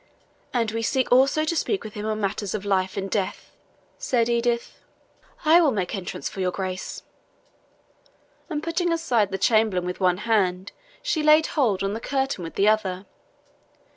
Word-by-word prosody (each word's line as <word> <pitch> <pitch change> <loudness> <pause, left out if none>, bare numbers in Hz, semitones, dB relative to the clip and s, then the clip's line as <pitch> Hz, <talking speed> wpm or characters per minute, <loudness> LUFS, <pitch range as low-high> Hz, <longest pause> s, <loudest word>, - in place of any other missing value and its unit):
"And 230 -3 0
we 225 +1 -2
seek 260 +3 0
also 275 +5 +4
to 335 - -1
speak 390 +4 -1
with 215 - -8
him 210 0 -5
on 215 0 -1
matters 205 0 -2
of 205 -1 -5
life 190 -1 0
and 195 0 -2
death," 195 -1 -3 0.5
said 240 -2 +1
Edith. 235 0 -1 0.7
"I 330 +3 +7
will 315 - +4
make 195 -8 -2
entrance 190 -2 -4
for - - -8
your 185 -1 +1
Grace." 185 0 -5 1.5
And 305 -2 -3
putting 340 +1 0
aside 245 - +1
the 195 - -3
chamberlain 215 -3 +2
with 180 0 -4
one 180 -2 +2
hand, 190 -4 +1 0.3
she 425 -11 0
laid 305 +1 +5
hold 225 - +1
on 195 +1 -1
the 220 - -4
curtain 270 -6 -2
with 165 - -7
the 200 - +3
other. 200 -3 +1
215 Hz, 170 wpm, -24 LUFS, 195-270 Hz, 1.5 s, I